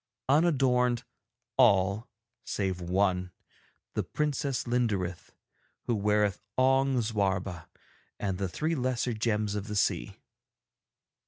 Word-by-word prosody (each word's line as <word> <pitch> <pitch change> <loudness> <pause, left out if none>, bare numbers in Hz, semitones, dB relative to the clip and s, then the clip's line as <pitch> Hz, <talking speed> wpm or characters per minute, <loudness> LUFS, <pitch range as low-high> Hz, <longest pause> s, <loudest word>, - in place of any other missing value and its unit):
Unadorned 130 -5 +3 0.5
all 100 -3 +4 0.3
save 95 -3 -2
one, 90 0 +1 0.6
the - - 0
Princess 145 -3 -1
Linderith, 105 -8 -1 0.5
who 120 - 0
weareth 105 -2 +1 0.2
Ong 135 0 +3
Zwarba 95 -5 -1 0.5
and 95 -2 -2
the 95 -2 -1
three 155 - -1
lesser 125 -3 0
gems 110 -2 0
of 105 0 -4
the 105 - -4
sea. - - 0
105 Hz, 100 wpm, -29 LUFS, 95-130 Hz, 0.6 s, all